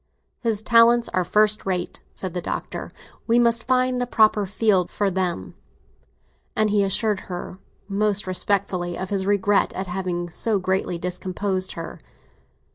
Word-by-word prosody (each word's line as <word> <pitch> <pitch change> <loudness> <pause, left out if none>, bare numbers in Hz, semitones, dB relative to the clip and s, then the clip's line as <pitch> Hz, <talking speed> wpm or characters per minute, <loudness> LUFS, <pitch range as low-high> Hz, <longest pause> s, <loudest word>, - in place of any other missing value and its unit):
"His 220 -3 -1
talents 235 0 +5
are 185 - 0
first 210 +4 +2
rate!" 180 -2 -3
said 185 -3 -5
the 180 - -3
Doctor. - - -5 0.4
"We 230 0 +3
must 235 -1 +2
find 255 -1 +1
a 245 - -1
proper 215 -4 +3
field 200 -3 +2
for 200 -2 -1
them!" 175 - -2 1.0
And 215 -1 +2
he 205 -1 +3
assured 205 +1 +1
her 180 +1 -6 0.3
most 205 0 0
respectfully 185 -2 0
of 185 +1 -5
his 195 -1 -1
regret 205 0 +2
at 190 - -3
having 175 -1 -3
so 220 +4 +2
greatly 185 -1 -1
discomposed 185 +2 -2
her. 165 -1 -7
195 Hz, 145 wpm, -23 LUFS, 185-215 Hz, 1.0 s, talents